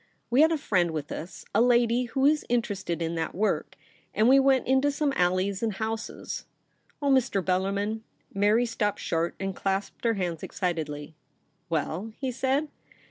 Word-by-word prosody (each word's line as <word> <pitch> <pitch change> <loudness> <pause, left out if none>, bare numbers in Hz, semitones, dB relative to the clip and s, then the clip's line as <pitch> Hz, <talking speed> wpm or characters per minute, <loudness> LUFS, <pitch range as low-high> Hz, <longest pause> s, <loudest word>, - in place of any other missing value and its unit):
We 255 +4 +5
had 320 +1 +6
a 325 - +2
friend 185 - +1
with 155 -3 -4
us, 170 +4 -7
a 215 - +4
lady 240 0 +3
who 265 +3 0
is 300 +1 +4
interested 205 -8 -1
in 165 0 -2
that 165 -1 -3
work; 210 +3 0 0.4
and 220 - +4
we 270 +2 +7
went 270 -1 +3
into 265 +2 +3
some 290 0 0
alleys 185 +2 +1
and 225 -2 0
houses. 220 +2 -4 0.6
Oh, 280 - +3
Mr. 260 -6 +3
Bellarmin 200 +4 0 0.2
!' - - -32
Mary 215 +4 +4
stopped 215 -3 -1
short, 165 +1 -1
and 195 -1 -3
clasped 195 0 -2
her 230 -1 +2
hands 175 -4 -2
excitedly. 160 -4 -3 0.6
'Well?' 165 +7 -2
he 265 -2 -1
said. 270 +4 0
215 Hz, 170 wpm, -27 LUFS, 180-250 Hz, 0.6 s, we